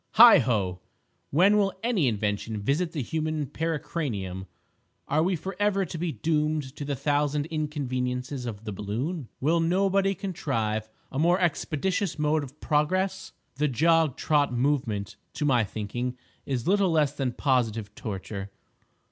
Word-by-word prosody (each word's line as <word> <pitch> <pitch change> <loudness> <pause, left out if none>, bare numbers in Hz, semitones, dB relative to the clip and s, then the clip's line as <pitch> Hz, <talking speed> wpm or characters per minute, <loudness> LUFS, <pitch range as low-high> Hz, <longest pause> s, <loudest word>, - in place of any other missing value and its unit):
Heigho! 115 - +6 0.5
when 190 +8 +5
will 195 -2 +2
any 220 - +2
Invention 105 0 -1
visit 150 - 0
the 150 -6 -3
human 155 +2 -2
pericranium? 125 - -3 0.6
Are 150 +3 +2
we 180 +3 +2
forever 195 +3 0
to 170 - -8
be 170 -1 -1
doomed 150 -3 -1
to - - -4
the 140 0 -2
thousand 145 +1 0
inconveniences 130 -4 -2
of 110 -2 -6
the 110 - -5
balloon? 115 - -3
Will 160 +5 +2
nobody 195 +3 +2
contrive 115 - -2 0.2
a 135 - -3
more 175 +4 +4
expeditious 180 +2 0
mode 150 0 +1
of 140 +2 -11
progress? 185 +6 0 0.2
The 150 +2 +2
jog 160 +2 +3
trot 145 -3 +2
movement, 120 -6 -1 0.2
to 150 - -2
my 125 -5 +4
thinking, 120 +5 -4 0.3
is 130 0 -2
little 195 0 +3
less 150 -4 +2
than 130 -4 -2
positive 115 -7 0
torture. 100 -2 -5
145 Hz, 140 wpm, -27 LUFS, 120-165 Hz, 0.6 s, Heigho